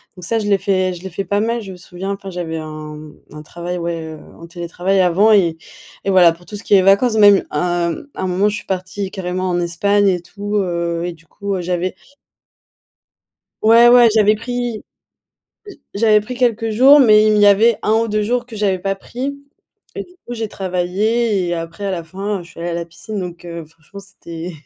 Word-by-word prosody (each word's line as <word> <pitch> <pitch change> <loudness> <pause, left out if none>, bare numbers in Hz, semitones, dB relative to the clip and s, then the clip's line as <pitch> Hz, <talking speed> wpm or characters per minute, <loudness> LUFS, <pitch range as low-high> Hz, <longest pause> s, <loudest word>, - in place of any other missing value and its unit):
donc 180 - -12
ça 225 +5 0
je 210 - -3
l'ai 200 -1 +3
fait 185 -1 0
je 175 - -12
l'ai 190 - -7
fait 195 +3 -4
pas 205 - 0
mal. 230 +2 -1
Je 195 -2 -9
me - - -12
souviens, 180 +2 -7
enfin, 195 -1 -8
j'avais 165 -2 -4
un, 155 -1 -7
mmh, 150 0 -12 0.2
un 150 - -9
travail, 175 +3 -6
ouais, 165 -2 -4
heu, 155 - -13 0.2
en 170 - -11
télétravail 175 +3 -2
avant 185 +5 +4
et 170 -6 +3 0.5
et 195 - -2
voilà 180 -3 +6
pour 175 +1 -19
tout 210 - -8
ce 205 - -10
qui - - -1
est 190 - +7
vacances 200 +5 +3
même, 205 -2 +6
un 175 +2 0 0.2
un 190 - -3
moment, 190 +3 +1
je 210 - -3
suis - - -9
partie 190 +1 -4
carrément 185 -1 -3
en 175 0 0
Espagne 200 +4 +1
et 180 -2 0
tout, 205 +3 -6
heu, 170 -3 -2
et 175 - -4
du 165 0 -22
coup, 200 +4 -4
heu, 185 - -3
j'avais 180 +1 -2 1.7
Ouais, 230 +2 +7
ouais, 240 -1 +7
j'avais 215 -1 +4
pris 245 -1 -4 0.9
j 400 - -12
j'avais 215 0 +4
pris, 250 +5 -7
quelques 230 -3 0
jours 265 +7 +7
mais 215 -5 +6
il - - +4
m 215 - +3
il - - +3
y 205 - +7
avait 215 +3 +4
1 215 - +1
ou 225 +1 +2
2 210 0 0
jours 245 +2 -1
que 230 -3 -11
j'avais 195 -3 0
pas 195 +1 -2
pris. 270 +7 -6 0.6
Et - - -4
du 360 - -17
coup 240 - -5
j'ai 225 -2 -4
travaillé 195 +3 -1
et 175 - -1
après 165 +4 -6
à 195 - -1
la 175 -2 -3
fin, 195 +4 -4
heu, - - -9
je 170 - -16
suis - - -13
allée 175 0 -3
à - - -3
la 170 0 -3
piscine 200 +5 -7
donc, 175 -1 -7
heu, 170 -1 -7
franchement 165 +5 -14
c'était 175 -3 -9
195 Hz, 230 wpm, -18 LUFS, 175-215 Hz, 1.7 s, est